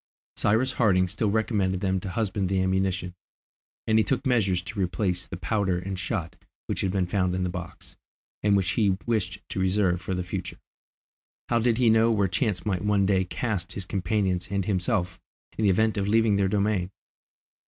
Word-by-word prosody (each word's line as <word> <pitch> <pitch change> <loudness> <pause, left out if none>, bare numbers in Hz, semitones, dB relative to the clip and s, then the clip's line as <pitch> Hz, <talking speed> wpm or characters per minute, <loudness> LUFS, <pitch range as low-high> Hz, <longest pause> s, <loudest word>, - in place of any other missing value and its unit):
Cyrus 115 +6 +2
Harding 100 -7 +3
still 105 +3 -1
recommended 100 -3 0
them 95 -1 +1
to 95 - -6
husband 100 -2 -1
the 95 -1 +1
ammunition, 95 -1 0 0.7
and 110 0 +3
he - - +4
took 130 +6 -1
measures 100 -8 +2
to 100 +3 -7
replace 90 0 -1
the 95 - -6
powder 95 +2 0
and 95 +1 -4
shot 95 -4 -3 0.3
which - - -2
had 95 - 0
been 95 -1 +1
found 90 0 0
in 95 - -1
the 90 - -1
box, 90 -1 -9 0.5
and 100 -1 +3
which 95 -2 0
he 100 -4 +2
wished 100 -5 -1
to - - -4
reserve 95 -1 +1
for 95 - -3
the 90 - -2
future. 90 - -5 0.9
How 120 - +3
did 115 0 +2
he 120 -3 +4
know 110 +1 +4
where 100 -4 +2
chance 100 +2 -1
might 95 -3 -1
one 105 -2 +2
day 95 -1 +2
cast 100 -2 -3
his 95 - -5
companions 95 -1 -1
and 100 -1 -1
himself 90 -2 -1 0.4
in 110 - 0
the - - +5
event 110 +3 +2
of 100 - 0
their 100 - -1
leaving 110 -2 +4
their 100 -1 +2
domain? 100 -2 0
95 Hz, 195 wpm, -26 LUFS, 90-110 Hz, 0.9 s, the